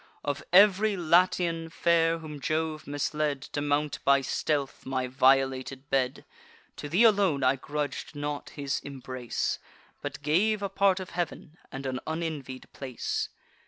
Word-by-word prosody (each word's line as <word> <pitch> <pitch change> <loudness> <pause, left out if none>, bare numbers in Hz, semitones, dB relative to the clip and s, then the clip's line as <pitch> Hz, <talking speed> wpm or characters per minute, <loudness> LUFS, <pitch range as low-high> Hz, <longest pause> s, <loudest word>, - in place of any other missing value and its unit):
Of 145 -1 -2
ev'ry 200 +2 +6
Latian 170 -1 +2
fair 165 0 +2
whom 155 -3 -8
Jove 155 +1 -2
misled 145 0 -1
To 145 - -4
mount 145 +1 0
by 140 0 +5
stealth 140 +1 -1
my 130 -1 -1
violated 130 +1 +2
bed, 130 -1 0 0.5
To 145 - -6
thee 185 +9 +4
alone 195 - +4
I 130 +1 +4
grudg'd 145 +2 -4
not 145 0 -4
his 140 -2 -3
embrace, 130 -3 -4 0.4
But - - -6
gave 200 +8 +2
a 200 - -1
part 195 -1 +3
of 185 - -7
heav'n, 175 -1 -4
and 135 +1 -6
an 130 -1 -2
unenvied 155 -5 -4
place. 130 -3 -3
150 Hz, 140 wpm, -28 LUFS, 135-170 Hz, 0.5 s, ev'ry